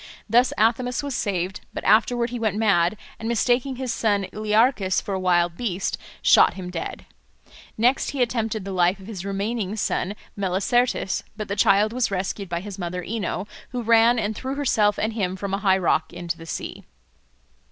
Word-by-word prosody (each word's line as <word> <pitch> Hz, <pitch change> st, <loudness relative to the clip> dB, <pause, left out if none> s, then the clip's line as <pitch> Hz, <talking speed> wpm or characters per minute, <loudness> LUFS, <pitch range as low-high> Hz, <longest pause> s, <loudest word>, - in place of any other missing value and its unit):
Thus 240 Hz, +4 st, +4 dB
Athamas 245 Hz, +4 st, +1 dB
was 285 Hz, -1 st, -3 dB
saved, 190 Hz, -4 st, -2 dB
but -, -, -4 dB
afterward 235 Hz, +2 st, +3 dB
he 245 Hz, -, -4 dB
went 215 Hz, -3 st, 0 dB
mad, 200 Hz, -3 st, +2 dB, 0.2 s
and 225 Hz, -, -3 dB
mistaking 245 Hz, +3 st, +1 dB
his 250 Hz, -2 st, -3 dB
son 205 Hz, -4 st, +1 dB
Learchus 215 Hz, -2 st, +2 dB
for 200 Hz, -, -5 dB
a 190 Hz, -, -1 dB
wild 175 Hz, -2 st, +2 dB
beast, 190 Hz, -3 st, -2 dB, 0.3 s
shot -, -, +6 dB
him 180 Hz, -2 st, -6 dB
dead. 170 Hz, -2 st, -5 dB, 0.7 s
Next 245 Hz, +5 st, +2 dB
he 275 Hz, -3 st, +1 dB
attempted 225 Hz, -4 st, -2 dB
the 195 Hz, -, -4 dB
life 180 Hz, +1 st, +2 dB
of 190 Hz, -, -12 dB
his 200 Hz, -4 st, -6 dB
remaining 200 Hz, +1 st, -2 dB
son 205 Hz, -2 st, -1 dB, 0.2 s
Melicertes, 200 Hz, +3 st, 0 dB, 0.2 s
but 215 Hz, -2 st, -5 dB
the 200 Hz, -, -1 dB
child 205 Hz, +2 st, +4 dB
was 250 Hz, -1 st, +1 dB
rescued 195 Hz, 0 st, -3 dB
by 170 Hz, 0 st, -2 dB
his 200 Hz, 0 st, -8 dB
mother 180 Hz, 0 st, -4 dB
Ino, 205 Hz, -1 st, -3 dB, 0.3 s
who 245 Hz, -1 st, -2 dB
ran 230 Hz, +1 st, +5 dB
and 215 Hz, -1 st, -1 dB
threw 265 Hz, +4 st, -4 dB
herself 215 Hz, -7 st, +2 dB
and 220 Hz, +1 st, -1 dB
him 190 Hz, -4 st, -1 dB
from 195 Hz, 0 st, -4 dB
a 195 Hz, -, 0 dB
high 190 Hz, -1 st, +3 dB
rock 160 Hz, -3 st, +1 dB
into 175 Hz, -1 st, -4 dB
the 165 Hz, 0 st, -12 dB
sea. -, -, -5 dB
205 Hz, 185 wpm, -24 LUFS, 190-230 Hz, 0.7 s, shot